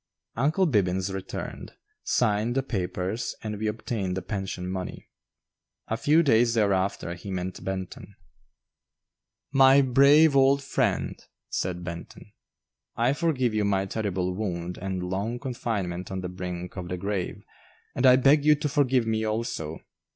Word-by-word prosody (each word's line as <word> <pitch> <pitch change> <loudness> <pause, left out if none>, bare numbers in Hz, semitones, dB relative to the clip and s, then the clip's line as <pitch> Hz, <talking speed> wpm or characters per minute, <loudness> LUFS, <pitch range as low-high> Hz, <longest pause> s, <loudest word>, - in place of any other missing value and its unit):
"Uncle 150 +10 +2
Bibbins" 95 - +1
returned, 95 -1 -6 0.3
signed 110 +3 +1
the 135 - +1
papers, 95 -1 -3
and 105 -2 -4
we 110 - -1
obtained 105 -4 -3
the 95 - -4
pension 95 -2 -4
money. 95 0 -5 0.8
A 110 - 0
few 150 +8 +3
days 120 -4 +3
thereafter 100 -4 +1
he 90 +3 -9
met 95 -1 -4
Benton. 95 -1 -6 1.4
"My 135 0 +6
brave 140 +4 +6
old 135 +1 +4
friend," 135 - -1 0.3
said 90 -1 -2
Benton, 85 +4 -8 0.6
"I 120 +3 +2
forgive 140 -7 0
you 105 -1 +1
my 100 -1 +1
terrible 95 -3 -2
wound 90 -3 -4
and 95 -1 -3
long 100 +6 -2
confinement 110 -8 -3
on 95 -1 -4
the 90 - -4
brink 90 -1 -6
of 90 -1 -5
the 90 - -3
grave, 100 0 -3 0.5
and 125 - -2
I 125 - +8
beg 140 +3 +4
you 150 0 +6
to 150 0 -2
forgive 135 -5 +2
me 110 -1 0
also. 110 -8 -3
105 Hz, 145 wpm, -26 LUFS, 95-125 Hz, 1.4 s, I